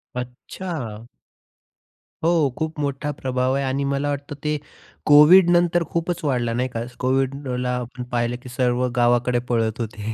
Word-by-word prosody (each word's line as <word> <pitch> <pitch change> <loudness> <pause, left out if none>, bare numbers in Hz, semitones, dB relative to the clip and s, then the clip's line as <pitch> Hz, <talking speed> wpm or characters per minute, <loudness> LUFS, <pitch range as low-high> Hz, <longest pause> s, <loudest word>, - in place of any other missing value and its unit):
अच्छा! 125 - -6 1.2
हो, 165 -4 +3
खूप 155 -1 -3
मोठा 145 +1 -2
प्रभाव 130 -1 -1
आहे. 140 - 0
आणि 135 +1 -1
मला 140 +1 -1
वाटतं 145 0 -4
ते 150 0 0 0.5
कोव्हिड 160 +5 +8
नंतर 175 0 +3
खूपच 170 0 -2
वाढला, 120 -5 0
नाही 125 +2 -1
का. 115 -1 -4 0.2
कोव्हिडला 130 -1 -1
आपण 125 +1 -6
पाहिलं, 120 0 0
की 125 - -9
सर्व 125 0 +1
गावाकडे 120 0 +2
पळत 115 -1 0
होते 110 0 -4
130 Hz, 140 wpm, -22 LUFS, 120-150 Hz, 1.2 s, कोव्हिड